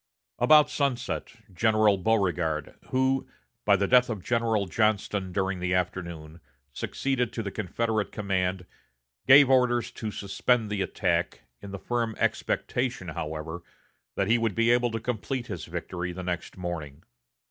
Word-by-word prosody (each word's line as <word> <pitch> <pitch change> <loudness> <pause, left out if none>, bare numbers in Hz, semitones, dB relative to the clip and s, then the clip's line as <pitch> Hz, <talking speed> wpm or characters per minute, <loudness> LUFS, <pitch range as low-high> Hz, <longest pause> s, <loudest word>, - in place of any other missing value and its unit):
About 150 +4 +6
sunset, 140 -5 -2 0.2
General 110 +1 +3
Beauregard, 90 -7 0 0.2
who, 130 +1 +1 0.4
by 100 - +6
the 100 0 +1
death 125 0 +5
of 105 -6 -4
General 115 -3 +1
Johnston 100 -1 0
during 95 0 -1
the 90 0 0
afternoon, 85 -3 -4 0.3
succeeded 125 - -1
to 115 - -3
the 100 - -4
Confederate 110 +2 -2
command, 95 -3 -1 0.6
gave 140 +1 +9
orders 125 -2 +3
to 110 - -5
suspend 105 +3 0
the 105 -2 -1
attack, - - -1 0.2
in 100 - -9
the 100 - -5
firm 115 +1 -2
expectation 120 -7 -1
however, 80 +1 -5 0.5
that 100 - 0
he 115 +2 +3
would 115 -3 0
be 115 +1 +3
able 120 0 +3
to 115 0 -3
complete 125 +2 -3
his - - -6
victory 90 -1 -4
the 90 +1 -7
next 90 -1 -4
morning. 80 -4 -6
105 Hz, 145 wpm, -27 LUFS, 90-120 Hz, 0.6 s, gave